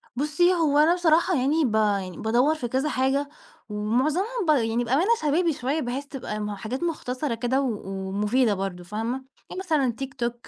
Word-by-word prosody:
بُصّي 300 +6 +2
هو 310 -4 +2
أنا 315 +3 +5
بصراحة 345 +1 +3
يعني 285 +4 +2
ب 220 -2 0
يعني 200 -4 0
بادوّر 245 +8 +2
في 245 -6 -4
كذا 265 +5 0
حاجة 275 +2 0 0.4
ومعظمهم 305 - 0
ب - - 0
يعني 235 -4 +2
بأمانة 280 - +1
شبابي 320 +2 +2
شوية 275 +5 -2
بحيث 255 +3 -3
تبقى 250 -6 -6
م 210 0 -3
حاجات 235 - -5
مختصَرة 260 -5 -2
كده 245 +4 0
و 235 -6 -2 0.3
ومفيدة 210 +3 +2
برضه 190 -2 -4
فاهمة؟ 225 +7 -3 0.3
يعني 370 - -6
مثلًا 295 -10 0
Youtube 260 -3 -3
260 Hz, 170 wpm, -25 LUFS, 225-305 Hz, 0.4 s, أنا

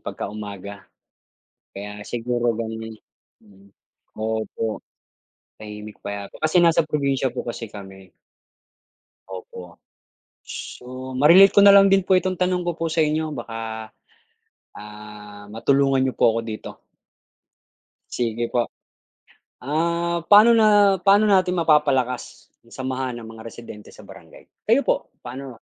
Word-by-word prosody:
pagkaumaga, 100 -1 -8 0.9
kaya 105 +1 -8
siguro 120 0 -1
gano'n 110 0 -5
'yun, - - -13 0.5
mm. 100 -2 -21 0.5
Opo, 110 0 -3 0.8
tahimik, 105 0 -10
payapa 100 -1 -6
kasi 155 +3 +2
nasa 165 -1 +4
probinsiya 140 -4 -1
po - - -3
kasi 115 -1 -5
kami, 95 -2 -12 1.2
opo. 90 -1 -10 0.7
So 130 +1 -8
ma-relate 175 +8 +7
ko 200 - +7
na 200 0 +8
lang 195 0 +7
din 195 -1 +4
po 190 - +3
itong 185 -1 -2
tanong 180 -1 0
ko 175 - 0
po 165 - -1
sa 160 - +1
inyo 155 +1 -1
baka, 115 -2 -6 0.9
ah, 105 0 -11
matulungan 135 +3 +2
niyo 130 - -2
po 115 - +4
ako 115 - 0
dito. 110 -1 -8 1.3
Sige 120 -1 -2
po. 120 -1 0 1.0
Ah, 170 +4 -1
paano 210 +3 +7
na 205 -4 +4
paano 200 +3 +4
natin 185 -3 +3
mapapalakas 140 -7 0 0.2
ang - - -14
samahan 130 -1 -4
ng - - -10
mga 110 0 -12
residente 110 -2 -11
sa - - -14
Barangay? - - -15 0.2
Kayo - - +3
po - - -1 0.2
paano? 130 -1 -8
125 Hz, 125 wpm, -22 LUFS, 110-165 Hz, 1.3 s, na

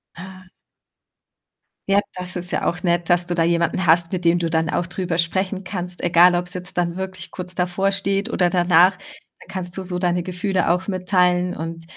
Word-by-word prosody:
Ah. 185 +1 -11 1.4
Ja, 200 +1 +5 0.2
das 180 0 -3
ist 180 0 -2
ja - - -1
auch 175 - -1
nett, 175 -1 0
dass 175 0 +3
du 175 - -2
da 165 - +2
jemanden 170 +2 +1
hast, 170 +2 +3
mit 180 -1 -2
dem 170 +1 +3
du 165 -1 -1
dann 160 0 0
auch 175 - -1
drüber 180 -2 -3
sprechen 190 +3 -1
kannst, 180 -1 -5
egal 175 +1 +5
ob's 180 +1 -2
jetzt 180 0 -7
dann 175 0 0
wirklich 190 0 -6
kurz 180 -1 -3
bevorsteht 195 +2 0
oder 180 -1 +1
danach. 180 +1 +4
Da 195 - -18
kannst 180 -1 -5
du 190 - -4
so 180 -1 -3
deine 175 -1 0
Gefühle 185 0 -1
auch 180 +3 0
mitteilen 180 -1 +1
und 165 +1 -6
180 Hz, 190 wpm, -21 LUFS, 175-185 Hz, 1.4 s, Ja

